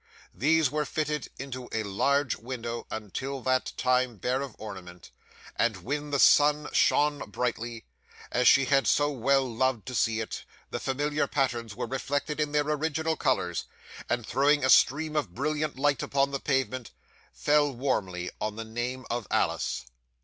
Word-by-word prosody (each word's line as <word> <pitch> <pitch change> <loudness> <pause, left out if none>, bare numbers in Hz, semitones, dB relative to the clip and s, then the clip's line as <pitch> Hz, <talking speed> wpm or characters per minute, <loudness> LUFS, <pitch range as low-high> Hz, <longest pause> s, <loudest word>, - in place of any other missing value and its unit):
These 155 +1 +3
were 150 0 0
fitted 150 -1 -2
into 130 -2 -7
a 110 - -1
large 135 +7 +1
window 120 -1 -5
until 120 +6 -4
that 130 0 +1
time 125 -2 +1
bare 125 +7 -1
of 140 -4 -6
ornament; 90 -5 -9 0.4
and 115 -4 +1
when 145 +5 -3
the 145 - 0
sun 150 +2 +5
shone 145 -5 +2
brightly, 115 +1 -3 0.5
as 125 0 +2
she 135 - +6
had 135 0 +3
so 145 0 +3
well 135 +1 +2
loved 125 -1 0
to 130 - -6
see 115 -1 +1
it, 110 - -5 0.3
the - - -2
familiar 145 +3 0
patterns 120 -6 -1
were 125 - -3
reflected 145 +3 -2
in 150 -1 0
their 150 0 +2
original 160 +1 0
colours, - - 0 0.4
and 120 -2 0
throwing 140 +3 +3
a 130 - +4
stream 155 +3 +4
of 110 - -1
brilliant 150 +1 -1
light 140 -2 +2
upon 140 0 +1
the 140 - -2
pavement, 130 -4 -1 0.4
fell 145 -1 +2
warmly 95 -9 -2
on 105 0 -2
the 115 0 -5
name 120 +3 -4
of 120 -3 -2
Alice. - - 0
130 Hz, 160 wpm, -28 LUFS, 115-145 Hz, 0.5 s, she